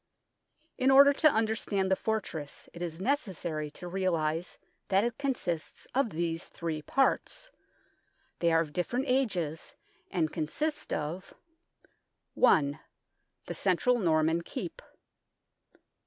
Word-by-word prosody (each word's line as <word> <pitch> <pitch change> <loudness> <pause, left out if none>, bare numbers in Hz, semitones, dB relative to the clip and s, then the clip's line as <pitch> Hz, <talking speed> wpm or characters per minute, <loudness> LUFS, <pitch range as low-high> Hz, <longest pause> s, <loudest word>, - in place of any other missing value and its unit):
In 260 - +4
order 280 +1 +8
to 310 +1 +5
understand 220 -4 0
the - - +5
fortress, 190 -10 -3
it 170 - -9
is 170 -1 -4
necessary 185 - -1
to 170 +4 -9
realize 175 -3 -1 0.3
that 195 +1 +3
it 235 +1 -2
consists 235 - -3
of 265 -2 +2
these 165 -1 -2
three 160 -2 -4
parts. 275 - 0 0.9
They 170 -1 +3
are 165 0 +4
of 150 -3 -5
different 240 +9 -1
ages, 190 - -1 0.3
and 160 -4 0
consist 295 - -2
of: 160 +6 -4 1.0
1. 145 -3 +4 0.7
The - - -4
central 220 +6 +2
Norman 160 -2 +2
Keep. 170 +1 -6
180 Hz, 115 wpm, -30 LUFS, 160-240 Hz, 1.0 s, order